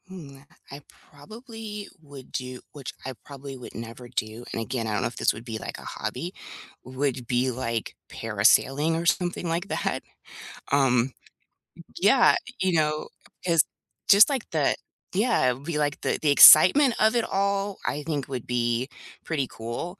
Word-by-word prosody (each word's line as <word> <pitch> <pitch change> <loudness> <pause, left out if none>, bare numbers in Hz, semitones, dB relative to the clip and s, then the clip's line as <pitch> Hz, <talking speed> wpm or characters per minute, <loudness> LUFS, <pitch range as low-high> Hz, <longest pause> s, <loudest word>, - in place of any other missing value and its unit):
Hmm, 160 -8 -11
uh, - - -17 0.3
I 140 +1 -9 0.3
probably 215 - -9
would 140 -4 -13
do 125 -1 -5
which 140 -3 -8
I 130 - -4
probably 140 -1 -9
would 125 - -11
never 115 +2 -8
do, 110 +2 -4
and 115 - -3
again, 115 0 -3
I 105 - -2
don't 105 - 0
know - - 0
if - - -9
this - - +2
would 115 +2 -11
be, 115 -3 -5
like, - - -7
a - - -11
hobby, - - -5 0.5
would 130 -1 -3
be, 125 +1 +1
like, 115 -2 -4
parasailing 150 +5 +2
or 170 - -4
something 175 +1 0
like 170 +3 -2
that. - - -2 0.7
Um, 130 -2 +3 0.9
yeah, - - +5 0.3
you 185 -1 +1
know, 155 -1 0 0.3
it's, 165 -4 +3 0.5
just, 205 +5 +8
like, 270 -5 -3
the - - +1 0.4
Yeah, 205 - +2
it - - +1
would 135 +3 -14
be, 165 -2 -3
like, 145 -1 -1
the - - 0
the 150 - +3
excitement 230 - +8
of 220 +2 +3
it 235 - +1
all, 200 0 -1
I 145 +1 -2
think 145 -3 -3
would 130 -3 -5
be 120 0 0 0.4
pretty 145 -5 -1
cool, 120 - -6
145 Hz, 170 wpm, -25 LUFS, 125-180 Hz, 0.9 s, just